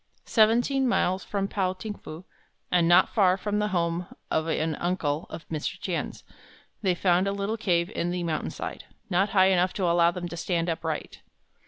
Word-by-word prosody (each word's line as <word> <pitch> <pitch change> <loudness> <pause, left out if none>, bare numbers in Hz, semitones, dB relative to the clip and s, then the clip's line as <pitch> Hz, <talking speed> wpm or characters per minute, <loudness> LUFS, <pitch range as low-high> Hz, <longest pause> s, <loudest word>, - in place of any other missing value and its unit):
Seventeen 240 +4 +3
miles 185 -5 +1
from 195 -1 -2
Pao 190 -2 -1
ting 210 +3 -6
fu, 165 -2 -10 0.5
and 175 -2 +4
not 175 - +6
far 190 -4 +4
from 205 +1 -1
the 210 - +1
home 170 -2 -1 0.2
of 160 0 +1
an 160 0 0
uncle 165 -3 -1
of 160 - -9
Mr. 155 -2 -3
Tien's, - - -4 0.6
they 185 -4 +2
found 180 +1 +2
a - - +1
little 200 +2 -2
cave 180 -4 0
in 175 - -2
the 180 0 -2
mountainside, 160 -2 -4 0.3
not 190 +3 +2
high 190 -1 +5
enough 180 0 +2
to 195 - -3
allow 170 0 +4
them 175 0 -4
to 170 - -6
stand 170 0 -1
upright. 160 -1 -4
180 Hz, 180 wpm, -27 LUFS, 170-200 Hz, 0.6 s, not